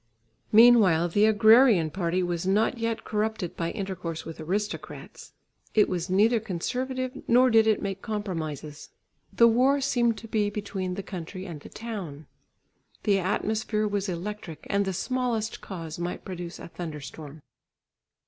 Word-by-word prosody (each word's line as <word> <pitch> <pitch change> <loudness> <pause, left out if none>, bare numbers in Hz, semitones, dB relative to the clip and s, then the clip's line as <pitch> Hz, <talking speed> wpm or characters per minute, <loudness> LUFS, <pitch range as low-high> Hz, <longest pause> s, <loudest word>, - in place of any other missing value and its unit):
Meanwhile, 210 -7 +6
the 205 +5 +3
agrarian 220 - +5
party 180 +1 -1
was 175 0 -2
not 215 +5 +2
yet 230 -1 -2
corrupted 215 -4 -2
by 165 -1 -2
intercourse 185 -5 -5
with 165 - -8
aristocrats; 200 +7 -5 0.4
it 210 - +5
was 180 -1 -3
neither 215 +5 +4
conservative 255 +7 -3
nor 250 +2 +5
did 225 0 +5
it 220 - +2
make 195 -1 -4
compromises. 160 - -5 0.4
The 235 - +5
war 255 +5 +3
seemed 240 -4 +1
to 225 - -9
be 210 -2 0
between 195 -3 -4
the 200 - -5
country 185 0 -7
and 170 -6 -7
the - - -12
town. 190 -10 -7 0.8
The 200 -3 +3
atmosphere 215 +3 -1
was 205 -1 -2
electric 175 -3 -6
and 200 0 +2
the 190 - -1
smallest 235 0 -2
cause 165 -4 -7
might 175 +1 -4
produce 175 -2 -6
a - - -9
thunderstorm. 155 -3 -8
200 Hz, 145 wpm, -27 LUFS, 175-220 Hz, 0.8 s, Meanwhile